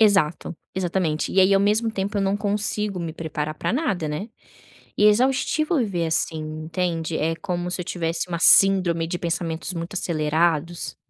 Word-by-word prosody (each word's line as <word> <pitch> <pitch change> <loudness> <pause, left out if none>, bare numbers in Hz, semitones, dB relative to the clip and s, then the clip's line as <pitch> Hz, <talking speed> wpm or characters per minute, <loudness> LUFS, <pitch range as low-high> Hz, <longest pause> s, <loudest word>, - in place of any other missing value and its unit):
Exato, 190 -6 +2 0.2
exatamente. 175 -4 -1
E 190 - +4
aí 190 +1 +5
ao 195 - +4
mesmo 215 +3 +2
tempo 200 0 -3
eu 195 - +1
não 195 +1 +1
consigo 205 -1 -2
me 165 -1 -4
preparar 155 -2 -4
para 155 - -2
nada, 200 - -1
né. 180 +10 -4 0.7
E - - +2
é 210 - +9
exaustivo 270 - +2
viver, 185 -8 -1
assim, 160 0 0
entende, 160 +1 -3
é 165 +2 0
como 180 0 -3
se 180 - -2
eu - - -4
tivesse 170 0 -3
uma 170 -1 -3
síndrome 180 -4 +5
de 175 +1 -3
pensamentos 170 0 -3
muito 170 +3 -5
acelerados. 165 0 0
175 Hz, 175 wpm, -23 LUFS, 165-200 Hz, 0.7 s, é